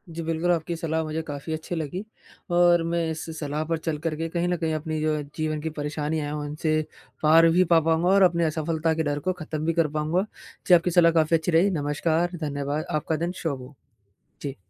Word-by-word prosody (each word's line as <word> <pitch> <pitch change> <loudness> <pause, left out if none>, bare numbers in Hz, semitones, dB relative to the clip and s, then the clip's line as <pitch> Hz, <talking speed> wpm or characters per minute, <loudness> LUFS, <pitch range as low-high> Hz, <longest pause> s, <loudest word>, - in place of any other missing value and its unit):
जी, 170 - -3
बिल्कुल 165 +2 0
आपकी 170 0 -1
सलाह 160 -1 -1
मुझे 155 +1 -3
काफ़ी 145 +2 -5
अच्छी 160 +2 -4
लगी 160 +4 -4 0.5
और 175 -1 +5
मैं 170 0 +1
इस 160 - -5
सलाह 150 0 -2
पर 165 - +2
चल 155 - 0
कर 160 -2 0
के 165 +1 -3
कहीं 170 +1 -1
न 175 0 0
कहीं 160 -1 -1
अपनी 155 0 -3
जो 155 0 +1
है 150 - -3
जीवन 155 -1 -2
की 160 - -2
परेशानी 150 +1 -2
है 145 -1 -3
उनसे 150 +1 -1 0.4
पार 165 +2 +7
भी 185 - +6
पा 165 - +7
पाऊँगा 165 +2 +1
और 195 +1 +5
अपने 170 -1 0
असफलता 160 +1 0
के 160 0 -1
डर 145 -1 -1
को 185 - +3
ख़त्म 155 0 -4
भी 165 - +1
कर 165 -2 +2
पाऊँगा। 170 +6 0 0.4
जी, 180 - +6
आपकी 175 +1 +2
सलाह 170 -1 +5
काफ़ी 165 0 +3
अच्छी 160 +2 -2
रही, 170 +5 +4
नमस्कार, 160 +1 0
धन्यवाद, 145 +1 -2
आपका 155 +1 -1
दिन 175 - -2
शुभ 145 -5 -2
हो। 130 +3 -12 0.7
जी। 140 -2 -4
160 Hz, 220 wpm, -25 LUFS, 150-170 Hz, 0.7 s, पार